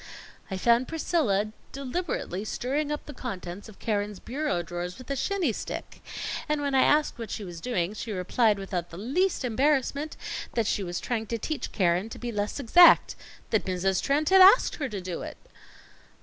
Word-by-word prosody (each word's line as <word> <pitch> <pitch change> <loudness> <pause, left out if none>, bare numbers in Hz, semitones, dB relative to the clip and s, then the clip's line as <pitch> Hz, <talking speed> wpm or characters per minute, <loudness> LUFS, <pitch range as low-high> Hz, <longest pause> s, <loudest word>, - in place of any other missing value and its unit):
"I 190 - -3
found 235 +5 +3
Priscilla 245 - 0 0.2
deliberately 275 - -3
stirring 280 +7 -2
up 295 - -4
the 295 - -8
contents 195 -5 -6
of 215 - -14
Keren's 205 -2 -2
bureau 275 - -2
drawers 175 +1 -5
with 255 +1 -9
a - - 0
shinny 340 - 0
stick, - - -7 0.5
and 300 0 +1
when 285 -1 -1
I 265 - +5
asked 300 -4 +3
what 225 -3 -5
she 210 - -4
was 175 -3 -8
doing, 190 -5 -1
she 220 +1 -6
replied 205 +3 +2
without 185 -3 -4
the 165 - -10
least 275 - 0
embarrassment, 280 +4 0 0.4
that 230 -2 +2
she 205 - 0
was 175 -1 -3
trying 225 -3 -3
to 230 - -2
teach 290 +4 -4
Keren 180 +2 +1
to - - -8
be 240 -1 -4
less 205 +4 -2
exact; 340 +7 +6 0.4
that 220 - +2
Mrs. 185 0 0
Trent 295 +2 +1
had 380 0 +7
asked 390 +6 +7
her 285 -4 -2
to 200 -4 -5
do 180 -2 -5
it." - - -7
230 Hz, 185 wpm, -27 LUFS, 195-285 Hz, 0.5 s, had